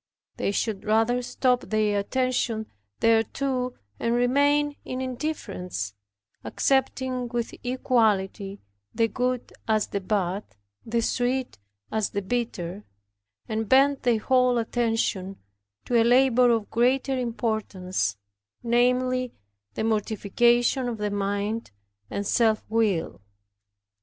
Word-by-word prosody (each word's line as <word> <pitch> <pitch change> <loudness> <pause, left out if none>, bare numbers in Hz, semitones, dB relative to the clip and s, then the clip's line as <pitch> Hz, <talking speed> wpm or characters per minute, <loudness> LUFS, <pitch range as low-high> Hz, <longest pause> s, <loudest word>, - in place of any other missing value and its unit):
They - - 0
should 205 -1 -2
rather 225 +3 +2
drop 250 0 +1
their 215 -1 +2
attention 240 -1 0 0.4
thereto, 250 +3 +1 0.2
and 235 0 +1
remain 285 +4 +3
in 255 - -5
indifference, 220 - -4 0.5
accepting 260 -2 0
with 235 -1 -3
equality 215 -6 0 0.3
the 230 - +3
good 250 +2 -2
as 215 -1 +2
the 200 - -2
bad, 190 0 -1 0.4
the 230 +1 0
sweet 250 - -1 0.3
as 215 -2 0
the 200 - -3
bitter, 200 -4 -3 0.6
and 220 -1 -2
bend 275 +1 +5
their 240 -3 +3
whole 250 +2 +3
attention 225 -5 -1 0.5
to 240 -2 +3
a - - +5
labor 250 0 +5
of 225 -3 0
greater 260 +3 +2
importance; 215 - -2 0.5
namely, 250 +1 +1 0.4
the - - -2
mortification 235 +4 +2
of 230 - -4
the 210 -1 -2
mind 205 +2 -2 0.4
and 200 - -3
self 220 0 +2
will. 210 - 0
230 Hz, 110 wpm, -26 LUFS, 210-250 Hz, 0.6 s, bend